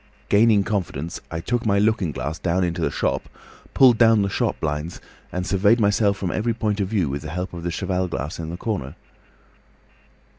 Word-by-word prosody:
Gathering 105 -1 +5
confidence, 85 -6 -3
I 80 0 -4
took 120 +6 -1
my 100 -2 +2
looking 105 -5 +2
glass 70 +4 -4
down 90 +1 0
into 85 0 -2
the - - +1
shop, - - -2 0.5
pulled 125 -4 +6
down 115 -3 +5
the 100 - -1
shop - - -1
blinds, 75 +2 -3 0.3
and 90 0 -3
surveyed 100 +5 +3
myself 100 -1 +2
from 90 -3 -2
every 115 +1 -1
point 105 -2 -1
of 100 - 0
view 95 -5 0
with 70 +1 -3
the 80 - -7
help 90 +4 -4
of 85 - -6
the 85 - -2
cheval 90 +2 -1
glass 75 -1 -5
in 80 -1 -5
the 85 - -5
corner. 90 - -4
95 Hz, 195 wpm, -23 LUFS, 85-105 Hz, 0.5 s, pulled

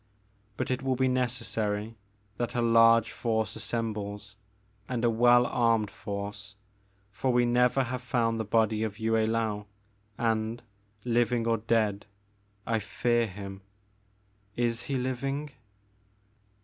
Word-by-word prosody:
But - - -2
it 125 +1 -1
will 130 -1 0
be 130 +1 +2
necessary 115 -4 -1 0.4
that 120 +1 -3
a 120 - +1
large 115 0 +5
force 110 -3 -1
as - - -7
sembles, 105 -3 -4 0.6
and 120 -2 -1
a 120 - +4
well 120 +2 +5
armed 115 -4 +1
force, 100 0 -6 0.6
for 125 +6 -1
we 120 0 +3
never 125 +2 +3
have 125 0 -4
found 115 -2 0
the - - 0
body 110 0 +1
of 110 -2 -3
Yue 110 0 -1
I^ou, 110 -2 0 0.5
and, 115 0 -1 0.4
living 120 -1 +1
or 115 0 +2
dead, 105 -3 0 0.6
I 115 -1 +1
fear 120 +2 0
him. 95 -1 -8 0.9
Is 120 -1 0
he 135 - 0
living 135 +3 -3
115 Hz, 130 wpm, -28 LUFS, 110-120 Hz, 0.9 s, large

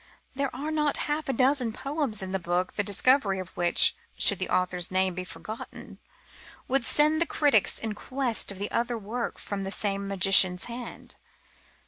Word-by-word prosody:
There 275 0 -1
are 300 +3 -4
not 300 -2 0
half 300 0 -3
a - - +1
dozen 255 -2 +2
poems 275 -6 -3
in 190 - -6
the 190 - -1
book 175 +1 -2
the - - -1
discovery 205 +1 +2
of 185 -1 -8
which, 175 -1 +3 0.2
should 200 - +4
the 185 - -3
author's 180 -1 0
name 185 0 0
be 180 +1 -5
forgotten, 215 +4 -9 0.7
would 265 -2 +1
send 305 +5 +3
the 340 - +2
critics 285 -9 +2
in 220 -1 -4
quest 250 0 -1
of 195 - -10
other 235 0 -1
work 225 +3 -5
from 200 -1 -5
the 195 - -4
same 200 -1 -1
magician's 190 -2 +6
hand. 240 +1 -8
215 Hz, 170 wpm, -27 LUFS, 190-270 Hz, 0.7 s, magician's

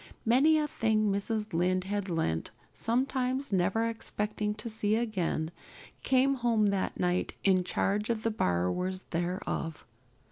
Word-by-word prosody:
Many 275 +7 +5
a 300 -1 +1
thing 215 -6 +1
Mrs. 210 +1 -2
Lynde 180 +2 +2
had 200 0 -3
lent, 120 - -1 0.2
sometimes 255 +1 -1
never 195 +5 +2
expecting 210 -2 -2
to 215 +2 -6
see 215 -1 0
it 230 - +1
again, 175 -7 -1 0.5
came 265 +1 +3
home 230 -5 +2
that 195 -1 -2
night 180 0 0
in 185 -2 +4
charge 205 +4 0
of 225 -2 -1
the 230 - +1
borrowers 180 - 0
thereof. 175 -2 -3
210 Hz, 140 wpm, -30 LUFS, 185-230 Hz, 0.5 s, Many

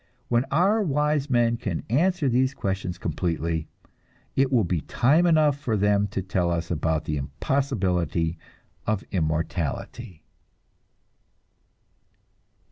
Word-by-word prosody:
When 120 +1 +2
our 190 +9 +2
wise 150 -3 0
men 120 -2 +2
can 105 -8 -3
answer 165 - +2
these 130 +2 +2
questions 95 -2 -3
completely, 85 -3 -2 0.7
it 135 0 +2
will 120 -4 +4
be 85 -3 -1
time 150 - +3
enough 155 -4 +3
for 115 -7 -1
them 105 0 +2
to 95 -1 -4
tell 90 -2 0
us 85 0 -2
about 80 -1 0
the 75 - -2
impossibility 85 - -1 0.5
of 105 -2 0
immortality. 80 - -3
105 Hz, 115 wpm, -25 LUFS, 85-135 Hz, 0.7 s, will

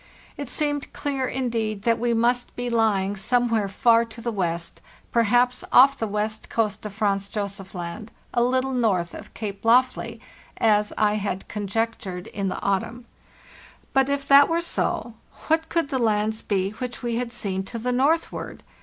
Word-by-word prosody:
It 285 -3 -6
seemed 290 -2 -2
clear, 275 -3 -2
indeed, 225 -6 -2
that 230 0 +2
we 240 +1 +1
must 245 +2 +1
be 245 0 -3
lying 205 -4 +2
somewhere 230 -1 +1
far 230 +3 +4
to 230 +1 -11
the 235 +1 -2
west, 170 -5 -3 0.3
perhaps 245 +2 +3
off 275 +2 +7
the 225 - -2
west 210 +1 -3
coast 215 -3 -1
of 200 - -11
Franz 200 -2 0
Josef 200 -3 -5
Land, 180 +5 -6 0.2
a 240 - +2
little 260 +2 +1
north 195 -9 +1
of - - -10
Cape 200 -3 -5
Lofley, 245 +3 +2 0.4
as 210 -2 +3
I 210 0 +2
had 195 -2 -3
conjectured 205 -3 -3
in 200 -1 -3
the 185 - -3
autumn. 225 +5 -1 0.9
But, 270 0 +3
if 280 0 -1
that 280 0 +7
were 335 +1 +1
so, 245 -7 -1 0.4
what 320 0 +2
could 330 -4 0
the 265 - 0
lands 215 -1 +1
be 195 -1 0
which 245 +3 -6
we 235 -1 -1
had 245 -1 -2
seen 200 -5 -2
to 235 - -6
the 245 +2 -2
northward? 285 +7 0
230 Hz, 170 wpm, -24 LUFS, 205-250 Hz, 0.9 s, off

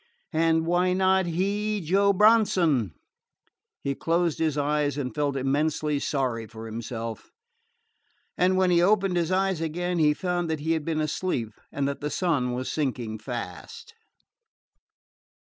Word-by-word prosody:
And 160 0 +2
why 180 +2 +2
not 190 0 +2
he, 205 +5 -1
Joe 195 +4 +3
Bronson? 185 - +3 0.9
He 140 - 0
closed 165 +2 0
his 155 -3 0
eyes 145 0 0
and 130 -3 -3
felt 145 -2 -1
immensely 145 +2 0
sorry 125 -6 -2
for 110 +1 -10
himself; 115 0 -6 1.1
and 185 +1 +2
when 185 -1 +3
he 170 -1 +4
opened 195 0 +3
his 170 0 0
eyes 190 -2 +1
again 175 +2 -2
he 150 -1 +4
found 175 0 -2
that 160 -2 -2
he 160 +2 -1
had 160 -2 0
been 160 -2 -1
asleep, 150 -7 -2 0.2
and 140 -1 -1
that 140 - -4
the 150 - -2
sun 145 -9 0
was 130 +1 -3
sinking 120 -7 -2
fast. 110 -6 -7
160 Hz, 145 wpm, -26 LUFS, 135-180 Hz, 1.1 s, he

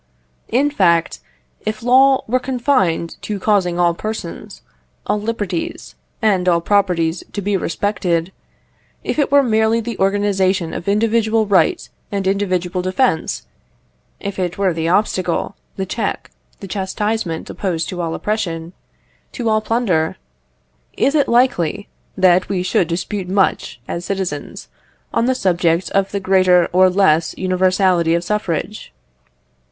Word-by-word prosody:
In 280 +5 +2
fact, 170 - +2 0.4
if 215 +1 -4
law 265 +2 +5
were 255 +3 +1
confined 250 - 0
to 210 - -4
causing 185 -4 +1
all 175 -1 +3
persons, 215 -2 -6 0.4
all 210 - 0
liberties, 230 - -4 0.3
and 190 -4 +3
all 170 -1 +3
properties 175 -3 +1
to - - -3
be 205 0 -1
respected 180 -1 -1 0.7
if - - -2
it 280 - +1
were 285 0 +6
merely 220 -1 +2
the 230 -2 -5
organisation 195 -3 +1
of 170 - -6
individual 220 +1 +2
right 190 -6 +2 0.2
and 200 -2 -2
individual 185 -2 0
defence 185 -1 0 0.7
if 200 -1 -5
it 180 -1 -2
were 195 -3 +1
the 165 0 -1
obstacle, 185 -1 0 0.2
the 190 - -3
check, 205 +2 -3 0.3
the 195 - -7
chastisement 195 -2 -2
opposed 170 -5 -3
to 180 -1 -4
all 165 -1 -2
oppression, 170 -6 -3 0.6
to 235 -3 -2
all 215 0 +2
plunder 190 -8 0 0.8
is 280 - +2
it 295 -2 +2
likely 205 -6 +1 0.3
that 185 -1 +4
we 185 -2 -1
should 180 -2 +1
dispute 185 +2 -3
much, 195 -9 0
as 170 - -4
citizens, 185 -7 -4 0.5
on 230 - +2
the 260 - +2
subject 175 -5 +1
of 195 0 +1
the 200 - -2
greater 185 -2 +4
or 185 +1 +6
less 170 -4 +2
universality 185 -2 +2
of 170 - -1
suffrage? 210 +1 -3
190 Hz, 135 wpm, -18 LUFS, 175-215 Hz, 0.8 s, were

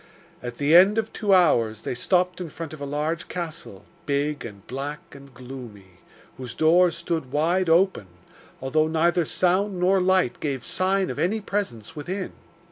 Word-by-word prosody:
At 120 -1 -7
the 145 +3 +3
end 195 +5 +7
of 220 0 -1
two 210 -2 -1
hours 115 - +3
they - - -3
stopped 180 +8 0
in 175 - -5
front 160 0 -7
of 155 - -10
a 140 - -4
large 150 +3 -2
castle, 160 - -7 0.2
big 145 +1 -1
and 100 -4 -10
black 140 +4 -6
and 140 0 -13
gloomy, 120 -8 -11 0.4
whose 125 -2 -8
doors 170 +2 +4
stood 160 -7 -3
wide 170 +5 +1
open, 170 - +3 0.5
although 155 +4 +1
neither 165 +2 +2
sound 185 +3 +1
nor 185 +1 +3
light 185 -8 +2
gave 135 -5 -3
sign 190 +1 0
of - - -6
any 210 +6 +1
presence 195 - -4
within. 180 +6 -5
160 Hz, 165 wpm, -24 LUFS, 135-180 Hz, 0.5 s, end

